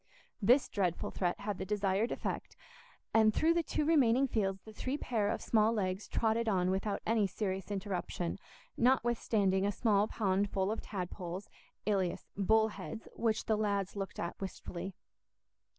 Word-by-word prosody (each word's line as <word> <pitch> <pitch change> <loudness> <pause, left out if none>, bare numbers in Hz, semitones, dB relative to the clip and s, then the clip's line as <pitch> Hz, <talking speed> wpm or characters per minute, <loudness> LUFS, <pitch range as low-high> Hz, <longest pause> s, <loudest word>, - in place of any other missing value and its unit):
This 245 +7 +5
dreadful 180 -4 -1
threat 175 +1 -1
had 205 -1 -3
the - - -2
desired 200 +2 0
effect, - - -4 0.6
and 220 -1 +6
through 320 +9 +3
the 340 - +2
two 305 -2 -1
remaining 275 -4 +4
fields 195 -5 -1
the 220 - -11
three 260 +6 -2
pair 220 -7 0
of 225 - -2
small 220 -1 +3
legs 190 -2 -1
trotted 225 0 +1
on 185 -2 +2
without 195 +2 -1
any 220 -2 +3
serious 190 -1 -3
interruption, 190 -3 -3 0.4
notwithstanding 230 -6 +2
a 200 - +2
small 205 -1 +2
pond 200 -2 +1
full 195 +1 0
of 220 - -3
tadpoles, 180 -1 -5 0.4
alias 195 -4 0
"bullheads," 220 +2 +1
which 225 -1 0
the 220 - +2
lads 200 -3 -1
looked 195 -1 -5
at 170 +3 -4
wistfully. 185 -1 -6
205 Hz, 150 wpm, -33 LUFS, 190-225 Hz, 0.6 s, and